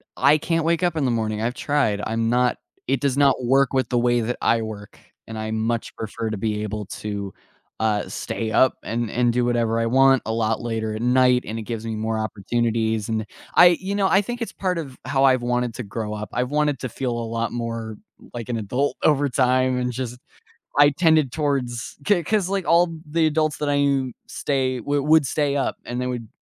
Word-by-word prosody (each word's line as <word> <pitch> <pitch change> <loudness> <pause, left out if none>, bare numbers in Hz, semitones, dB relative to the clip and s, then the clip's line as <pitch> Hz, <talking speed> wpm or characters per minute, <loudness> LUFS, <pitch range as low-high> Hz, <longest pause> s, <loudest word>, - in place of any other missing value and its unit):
I 145 +2 +5
can't 165 +1 -1
wake 170 +1 +1
up 175 -2 +1
in 145 -4 0
the 125 - +1
morning, 110 -2 -1
I've 120 +2 -1
tried, 130 -10 0
I'm 115 +1 -1
not 125 0 +2 0.3
it 135 -1 0
does 140 -1 0
not 140 -1 +5
work 135 +2 +3
with 130 -1 +1
the 125 - +1
way 120 0 +2
that 120 +2 -2
I 115 0 +2
work, 105 -2 -8 0.3
and 110 -1 -7
I 110 0 -4
much 115 +1 -2
prefer 110 +1 -4
to 110 - -3
be 105 0 -2
able 105 -1 -4
to, 100 -1 -5 0.5
uh, 105 -2 +1
stay 110 -1 -4
up 130 - +4
and 115 0 -2
and 120 0 +2
do 125 0 +1
whatever 115 -1 +1
I 115 - +1
want 135 +2 +4
a 110 - -2
lot 110 -1 0
later 110 -2 -3
at 110 - -5
night, 125 0 +4
and 110 +2 -4
it - - -5
gives 115 0 -5
me 110 -1 -3
more 110 +1 -2
opportunities, 110 +1 -1
and 110 -1 -1 0.3
I 175 -1 +7
you 190 +2 -4
know, 195 -2 +2
I 195 +2 +4
think 240 +4 -6
it's 230 - -4
part 185 -2 -1
of 135 -6 -6
how 135 0 +1
I've 130 -2 +4
wanted 125 -1 -1
to 125 - -5
grow 105 +1 -5
up, 105 0 -5
I've 125 +1 -1
wanted 150 -2 +1
to 130 - -4
feel 125 +2 -3
a 120 -1 -3
lot 115 0 -2
more 115 -2 -4 0.4
like 120 0 -6
an 115 - -1
adult 125 +7 -1
over 145 -2 +3
time 130 0 +2
and 125 0 -1
just 125 0 -5 0.6
I 145 - +8
tended 155 -3 +3
towards 135 -6 -2
‘c 180 -5 +3
'cause 200 -2 +1
like 195 -3 -1
all 170 +1 +5 0.2
the 160 +1 +1
adults 155 -1 0
that 150 -1 -1
I 145 - +2
knew 140 -2 +1 0.2
stay 130 -3 -1
w 145 +4 -1
would 150 -2 +4
stay 145 -2 0
up 140 - 0
and 125 +1 -3
they 125 - -2
would 120 -3 -4
125 Hz, 225 wpm, -23 LUFS, 115-145 Hz, 0.6 s, I